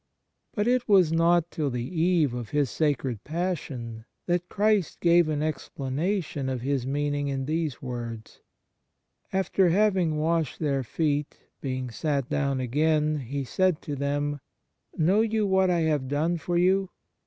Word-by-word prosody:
But 210 Hz, +1 st, 0 dB
it 245 Hz, -1 st, +1 dB
was 185 Hz, -6 st, +5 dB
not 170 Hz, +1 st, +3 dB
till 150 Hz, -3 st, -1 dB
the 125 Hz, -1 st, -3 dB
eve 165 Hz, -4 st, +2 dB
of 120 Hz, -3 st, -5 dB
His 145 Hz, -4 st, 0 dB
sacred 135 Hz, -7 st, -1 dB
Passion 140 Hz, -9 st, -4 dB, 0.2 s
that 175 Hz, 0 st, -1 dB
Christ 210 Hz, -3 st, +1 dB
gave 170 Hz, -1 st, +4 dB
an 150 Hz, -1 st, -1 dB
ex 155 Hz, -3 st, -3 dB
planation 145 Hz, 0 st, -2 dB
of 125 Hz, -2 st, -3 dB
His 135 Hz, -1 st, -1 dB
meaning 145 Hz, +1 st, -1 dB
in 135 Hz, -1 st, -2 dB
these 155 Hz, -3 st, -2 dB
words: 120 Hz, -3 st, -6 dB, 0.5 s
" -, -, -53 dB
After 190 Hz, -1 st, +2 dB
having 185 Hz, -4 st, +2 dB
washed 160 Hz, -2 st, 0 dB
their 140 Hz, -4 st, 0 dB
feet... 145 Hz, +3 st, -1 dB, 0.2 s
being 130 Hz, -2 st, -3 dB
sat 140 Hz, +1 st, -1 dB
down 140 Hz, -2 st, 0 dB
again, 150 Hz, +4 st, +1 dB
He 140 Hz, +2 st, -4 dB
said 185 Hz, +5 st, +1 dB
to 145 Hz, -, -4 dB
them: 145 Hz, +1 st, -1 dB, 0.6 s
Know 185 Hz, +7 st, +3 dB
you 220 Hz, -1 st, +1 dB
what 190 Hz, -1 st, +3 dB
I 175 Hz, -2 st, +2 dB
have 150 Hz, -4 st, 0 dB
done 160 Hz, +5 st, 0 dB
to 175 Hz, +2 st, -3 dB
you 190 Hz, +2 st, +3 dB
150 Hz, 155 wpm, -26 LUFS, 135-175 Hz, 0.6 s, was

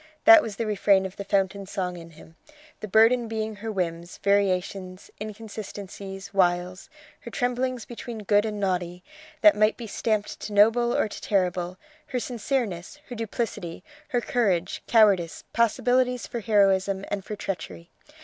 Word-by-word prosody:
That 335 Hz, 0 st, +10 dB
was 220 Hz, -8 st, -5 dB
the 230 Hz, -, -2 dB
refrain 200 Hz, -2 st, +3 dB
of 190 Hz, -, -6 dB
the 200 Hz, -, -4 dB
fountain 195 Hz, 0 st, 0 dB
song 185 Hz, -3 st, -3 dB
in 165 Hz, -1 st, -10 dB
him; 160 Hz, 0 st, -16 dB, 0.4 s
the 215 Hz, -, -6 dB
burden 225 Hz, +4 st, +4 dB
being 220 Hz, -1 st, -3 dB
her 220 Hz, +2 st, -5 dB
whims, 170 Hz, -3 st, -3 dB
variations, 190 Hz, -1 st, 0 dB
inconsistencies, 200 Hz, -2 st, -8 dB
wiles; 180 Hz, -, +1 dB, 0.3 s
her 240 Hz, -, -9 dB
tremblings 250 Hz, 0 st, -1 dB
between 235 Hz, -2 st, -7 dB
good 205 Hz, +1 st, +3 dB
and 215 Hz, -1 st, -3 dB
naughty, 180 Hz, -2 st, -2 dB, 0.4 s
that 315 Hz, -, +7 dB
might 215 Hz, +1 st, +3 dB
be 235 Hz, -, -7 dB
stamped 215 Hz, 0 st, -2 dB
to 210 Hz, -, -6 dB
noble 225 Hz, +4 st, +4 dB
or -, -, +2 dB
to -, -, -9 dB
terrible; 180 Hz, -2 st, 0 dB, 0.3 s
her 250 Hz, -, -2 dB
sincereness, 235 Hz, -4 st, -3 dB
her 245 Hz, -, -6 dB
duplicity, 220 Hz, -6 st, -4 dB, 0.2 s
her 245 Hz, -1 st, 0 dB
courage, 195 Hz, -8 st, 0 dB
cowardice, 200 Hz, -7 st, +3 dB
possibilities 250 Hz, +2 st, +2 dB
for 240 Hz, -, -5 dB
heroism 195 Hz, -2 st, +2 dB
and 200 Hz, -1 st, -2 dB
for 210 Hz, -, -6 dB
treachery. 185 Hz, -3 st, -6 dB
205 Hz, 150 wpm, -26 LUFS, 185-225 Hz, 0.4 s, That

